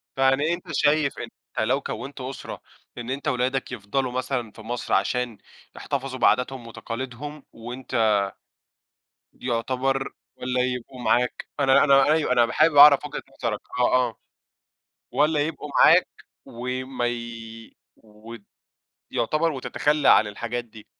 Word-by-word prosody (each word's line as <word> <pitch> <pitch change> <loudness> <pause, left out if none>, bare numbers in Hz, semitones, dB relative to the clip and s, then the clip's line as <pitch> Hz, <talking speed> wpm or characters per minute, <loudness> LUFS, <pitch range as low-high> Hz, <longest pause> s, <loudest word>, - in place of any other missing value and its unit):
فيعني 135 +5 +2
أنت 175 +1 -6
شايف 145 0 +2
إن - - -5 0.3
أنت 110 - +1
لو 135 +2 +1
كونت 135 0 -6
أسرة، 130 +1 -7 0.4
إن 120 0 -6
أنت 140 +3 -4
ولادك 130 -1 -1
يفضلوا 125 +3 -2
مثلًا 125 -3 -3
في - - -13
مصر، 120 +2 -4
عشان 125 -3 0 0.4
يحتفظوا 135 -2 -4
بعاداتهم 125 0 +1
وتقاليدهم، 130 +5 -7
وأنت 120 -1 -1 1.2
يعتبر 130 +3 -2 0.2
والّا 125 0 -1
يبقوا 125 0 -4
معاك، 120 +2 +1
أنا 135 0 +5
أنا 140 -2 +6
أيوه، 155 -5 +2
أنا 120 -2 +3
حابب 155 0 +4
أعرف 145 0 +8
وجهة 150 - -5 0.2
نظرك 110 -3 -1 0.2
آه، 125 - +3 0.2
آه، 110 - -14 1.0
والّا 150 0 +2
يبقوا 150 -1 -3
معاك - - +6 0.4
وما 125 +1 -4
ي 115 -1 -7 0.2
و 110 +2 -13 0.8
يعتبر 155 +7 +1
وتتخلى 145 +2 +1
عن 105 - +6
الحاجات 120 +3 -4
دي. 110 -2 -15
125 Hz, 130 wpm, -24 LUFS, 120-140 Hz, 1.2 s, أعرف